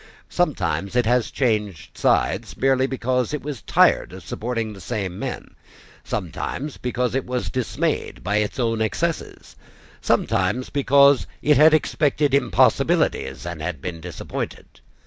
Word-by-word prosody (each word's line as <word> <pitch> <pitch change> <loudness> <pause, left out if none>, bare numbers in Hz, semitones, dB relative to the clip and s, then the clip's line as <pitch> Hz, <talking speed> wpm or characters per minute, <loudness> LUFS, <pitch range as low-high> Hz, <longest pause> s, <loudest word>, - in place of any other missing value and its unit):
Sometimes 105 - -1
it 125 -1 +3
has 120 0 +2
changed 105 - -1
sides, 95 -1 +1
merely 135 +1 +2
because 130 0 -1
it 150 - -6
was 140 -6 -5
tired - - +3
of - - -10
supporting 115 -2 -3
the 100 - -12
same 95 -2 -4
men, - - -6 0.5
sometimes 145 +1 -4
because 125 -1 -2
it 135 0 0
was 125 0 -3
dismayed 125 -6 -2
by 105 +4 0
its 105 -1 -1
own 115 -2 0
excesses, 110 - -3 0.5
sometimes 115 +3 0
because 140 -1 +4 0.2
it 150 -2 +4
had 155 +2 +7
expected 150 -2 +1
impossibilities, 140 -9 +2
and 85 -3 -5
had 80 -2 -4
been 85 +3 -6
disappointed. 85 0 -6
120 Hz, 135 wpm, -22 LUFS, 100-135 Hz, 0.5 s, had